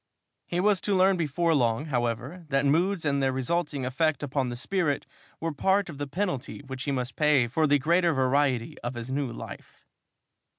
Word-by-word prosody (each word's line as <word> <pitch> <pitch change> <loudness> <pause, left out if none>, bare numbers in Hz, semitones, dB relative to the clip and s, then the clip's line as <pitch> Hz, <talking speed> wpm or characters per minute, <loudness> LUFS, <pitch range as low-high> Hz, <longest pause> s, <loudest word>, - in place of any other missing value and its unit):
He 175 - -1
was 200 0 +3
to 205 - 0
learn 190 +1 +4
before 165 0 +1
long, 120 -1 +1
however, 130 +5 -2
that 135 0 +2
moods 170 +5 +2
and 140 -1 +1
their 135 -1 +2
resulting 140 +1 -1
effect 150 +4 0
upon 135 -2 -1
the 120 - -4
spirit 150 +3 -1 0.3
were 165 0 -2
part 190 +5 +1
of 145 - -11
the 145 - -3
penalty 175 -5 -3
which 130 0 -6
he 145 - 0
must 130 -2 -3
pay 150 -5 +3
for 155 +6 +1
the 145 0 +4
greater 170 +4 +3
variety 130 -3 +1
of 120 +1 -5
his 120 +2 -6
new 135 -2 -1
life. 115 - -10
145 Hz, 185 wpm, -27 LUFS, 130-170 Hz, 0.3 s, learn